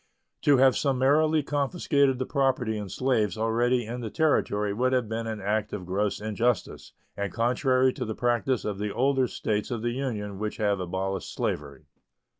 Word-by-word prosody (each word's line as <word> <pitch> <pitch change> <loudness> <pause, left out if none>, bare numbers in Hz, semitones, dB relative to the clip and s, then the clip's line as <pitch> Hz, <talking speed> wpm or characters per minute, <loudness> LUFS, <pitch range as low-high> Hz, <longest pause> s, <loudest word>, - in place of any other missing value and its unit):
To 145 -2 +5
have 130 0 +5
summarily 145 +3 +2
confiscated 140 -1 +1
the 130 - -2
property 130 -5 0
in 105 -2 -5
slaves 110 -4 0
already 120 +2 +1
in 120 +3 -5
the 115 - -4
Territory 105 -10 +1
would 130 +4 +1
have 125 -3 +1
been 115 +1 -3
an 110 -1 -4
act 105 +1 -1
of 95 -3 -5
gross 100 +3 -1
injustice 110 +3 -2 0.2
and 100 -2 -3
contrary 130 - +2
to 130 - -4
the 110 -1 -4
practice 120 0 0
of 100 -2 -3
the 105 0 -2
older 130 +2 +2
States 105 -2 -2
of 120 -3 -3
the 120 - 0
Union 110 -7 -4
which 105 0 -3
have 100 -2 +1
abolished 95 +1 -3
slavery. 70 0 -4
115 Hz, 175 wpm, -27 LUFS, 105-130 Hz, 0.2 s, To